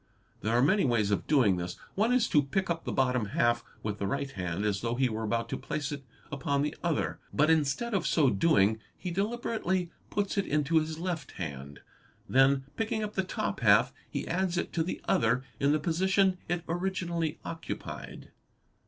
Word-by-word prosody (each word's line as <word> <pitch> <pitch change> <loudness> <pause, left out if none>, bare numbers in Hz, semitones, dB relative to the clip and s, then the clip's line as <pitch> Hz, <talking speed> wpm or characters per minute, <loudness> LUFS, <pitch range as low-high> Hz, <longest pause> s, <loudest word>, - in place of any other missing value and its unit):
There 115 +3 +1
are 125 - +4
many 190 +7 +4
ways 115 -6 +2
of 100 - 0
doing 120 -11 +4
this; 90 0 -4 0.2
one 220 +4 +2
is 250 -2 +3
to 150 - +5
pick 175 +7 -1
up 165 -1 -3
the - - -2
bottom 125 -3 +1
half 120 0 +3
_ - - -29 0.2
with 105 -1 -3
the 100 - -1
right 140 +5 -2
hand 90 -1 -3
as 100 -3 0
though 115 0 -1
he 130 0 +2
were 110 0 -3
about 115 +1 -1
to - - -2
place 145 +2 -3
it 140 -2 -5 0.3
upon 140 0 0
the 150 - -2
other; 170 -3 0
but 150 +2 +3
instead 160 +10 +1
of 190 -4 +1
so 145 -6 +4
doing, 110 -2 +3 0.2
he 180 - -4
deliberately 195 -3 -1 0.2
puts 205 0 0
it 200 - -1
into 150 +2 +2
his 155 0 -3
left 170 -4 -4
hand. 70 -4 -6 0.5
Then 135 +1 +4
picking 220 -1 -1
up 210 0 -4
the 190 - +1
top 180 - -3
half - - +5 0.2
he - - -4
adds 180 0 0
it - - -2
to 165 - +1
the 170 - -3
other 120 +3 +2 0.2
in 140 +1 +3
the 155 - +4
position 185 +4 +2
it 175 -1 -1
originally 175 -2 -1
occupied. 165 -1 -7
150 Hz, 195 wpm, -30 LUFS, 120-180 Hz, 0.5 s, to